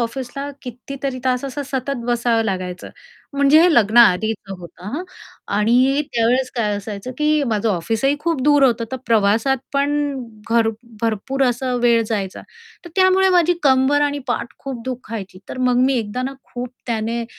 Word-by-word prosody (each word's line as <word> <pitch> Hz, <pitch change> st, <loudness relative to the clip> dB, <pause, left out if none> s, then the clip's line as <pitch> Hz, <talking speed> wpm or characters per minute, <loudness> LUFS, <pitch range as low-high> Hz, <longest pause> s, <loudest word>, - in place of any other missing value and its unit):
ऑफिसला 265 Hz, +4 st, -4 dB
कितीतरी 260 Hz, +2 st, -6 dB
तास 255 Hz, +1 st, 0 dB
असं 275 Hz, +2 st, -4 dB
सतत 270 Hz, -1 st, -3 dB
बसावं 235 Hz, -1 st, +1 dB
लागायचं. 185 Hz, -3 st, -4 dB, 0.4 s
म्हणजे 280 Hz, +2 st, +5 dB
हे 345 Hz, 0 st, +5 dB
लग्नाआधीचं 220 Hz, -3 st, +4 dB
होतं 175 Hz, 0 st, -13 dB
हां. 340 Hz, -, -3 dB, 0.5 s
आणि 250 Hz, +7 st, +3 dB
त्यावेळेस 245 Hz, +3 st, +1 dB
काय 215 Hz, -3 st, 0 dB
असायचं, 205 Hz, +3 st, -6 dB
की 300 Hz, 0 st, +2 dB
माझं 225 Hz, -2 st, 0 dB
ऑफिसही 225 Hz, -, 0 dB
खूप 330 Hz, -5 st, -1 dB
दूर 290 Hz, 0 st, +4 dB
होतं, 235 Hz, -3 st, +2 dB
तर -, -, -1 dB
प्रवासात 225 Hz, +4 st, +3 dB, 0.2 s
पण 280 Hz, +1 st, +1 dB, 0.6 s
घर 230 Hz, -1 st, +3 dB, 0.3 s
भरपूर 230 Hz, +5 st, -1 dB
असा 250 Hz, +1 st, 0 dB
वेळ 235 Hz, -1 st, +4 dB
जायचा. 200 Hz, -4 st, -3 dB, 0.4 s
तर 345 Hz, -, -10 dB
त्यामुळे 375 Hz, 0 st, +4 dB
माझी 355 Hz, -1 st, +4 dB
कंबर 270 Hz, +1 st, +4 dB
आणि 290 Hz, 0 st, +1 dB
पाठ 240 Hz, -, -2 dB
खूप 260 Hz, -4 st, -6 dB
दुखायची, 225 Hz, -7 st, -6 dB
तर -, -, -7 dB
मग 250 Hz, -1 st, +2 dB
मी 270 Hz, -, +2 dB
एकदा 225 Hz, +3 st, -3 dB
ना, 265 Hz, +1 st, -3 dB, 0.2 s
खूप 245 Hz, 0 st, -4 dB, 0.2 s
त्याने 230 Hz, 0 st, -2 dB
245 Hz, 155 wpm, -20 LUFS, 225-275 Hz, 0.6 s, म्हणजे